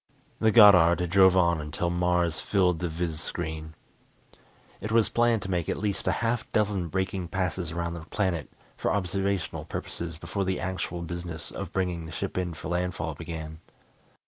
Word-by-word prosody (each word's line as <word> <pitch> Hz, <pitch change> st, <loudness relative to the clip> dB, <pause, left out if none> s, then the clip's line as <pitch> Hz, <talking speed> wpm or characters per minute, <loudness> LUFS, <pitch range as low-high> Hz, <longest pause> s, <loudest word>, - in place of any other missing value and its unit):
The 110 Hz, 0 st, +4 dB
Goddard 90 Hz, -6 st, +7 dB
drove 95 Hz, 0 st, +6 dB
on 85 Hz, -3 st, +3 dB
until 75 Hz, +3 st, -2 dB
Mars 85 Hz, -2 st, +1 dB
filled 90 Hz, -4 st, +2 dB
the 90 Hz, -, -2 dB
viz 80 Hz, -1 st, -3 dB
screen. 80 Hz, -2 st, -4 dB, 1.0 s
It 110 Hz, +2 st, -5 dB
was 115 Hz, -1 st, +4 dB
planned 120 Hz, -2 st, +2 dB
to 95 Hz, -, -4 dB
make 85 Hz, -3 st, -1 dB
at -, -, 0 dB
least 100 Hz, -1 st, -2 dB
a -, -, +4 dB
half 115 Hz, 0 st, -1 dB
dozen 100 Hz, -4 st, +1 dB
braking 95 Hz, +1 st, -2 dB
passes 90 Hz, -1 st, -2 dB
around 85 Hz, 0 st, -2 dB
the 85 Hz, -, -5 dB
planet 95 Hz, -7 st, -1 dB, 0.3 s
for -, -, -1 dB
observational 95 Hz, -1 st, -1 dB
purposes 85 Hz, -2 st, -5 dB
before 85 Hz, +5 st, -3 dB
the 95 Hz, -1 st, -1 dB
actual 90 Hz, -1 st, -3 dB
business 85 Hz, -1 st, -6 dB
of 95 Hz, -3 st, -6 dB
bringing 90 Hz, -3 st, -2 dB
the -, -, -9 dB
ship -, -, -4 dB
in 90 Hz, -2 st, -2 dB
for -, -, -7 dB
landfall 90 Hz, -2 st, -2 dB
began. 80 Hz, 0 st, -7 dB
90 Hz, 170 wpm, -27 LUFS, 85-95 Hz, 1.0 s, Goddard